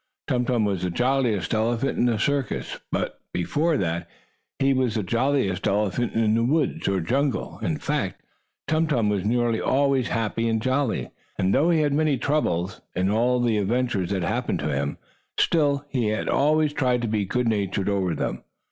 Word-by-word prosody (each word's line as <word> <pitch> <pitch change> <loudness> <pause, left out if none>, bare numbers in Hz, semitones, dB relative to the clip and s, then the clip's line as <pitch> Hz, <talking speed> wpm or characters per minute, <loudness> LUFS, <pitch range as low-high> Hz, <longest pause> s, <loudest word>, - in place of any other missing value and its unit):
Tum 125 -1 0
Tum 120 -3 +1
was 100 -3 -1
the 90 - -1
jolliest 125 -1 0
elephant 115 +4 0
in 120 - +2
the 115 -2 +1
circus, 140 +1 -1
but - - -2 0.2
before 150 - +1
that 85 -1 -2 0.5
he 135 0 +3
was 130 -4 0
the 110 - 0
jolliest 115 -1 0
elephant 105 +3 0
in 110 -1 +2
the 115 +1 +2
woods 145 +4 0
or 95 -2 +1
jungle. 135 - -1
In - - -1
fact, - - -2 0.5
Tum 160 +2 +2
Tum 120 -8 +1
was 100 -3 0
nearly 115 +1 +1
always 135 -2 +2
happy 115 0 -1
and 110 0 +1
jolly, 130 +1 -1 0.3
and, 95 +1 +1
though 160 +4 +3
he 165 -2 +3
had 145 -2 +1
many 150 -2 +2
troubles, 105 - -1
in 95 +2 +1
all 120 +3 +2
the 115 -3 +2
adventures 105 -3 0
that 95 -3 -1
happened 110 +8 -1
to - - -1
him, 70 +1 -2 0.4
still, 145 -3 +2
he 120 -6 0
always 150 +5 +2
tried 125 -4 +1
to - - 0
be 105 -1 0
good 125 +5 -1
natured 100 -3 0
over 95 -4 0
them. - - -3
120 Hz, 180 wpm, -24 LUFS, 100-135 Hz, 0.5 s, he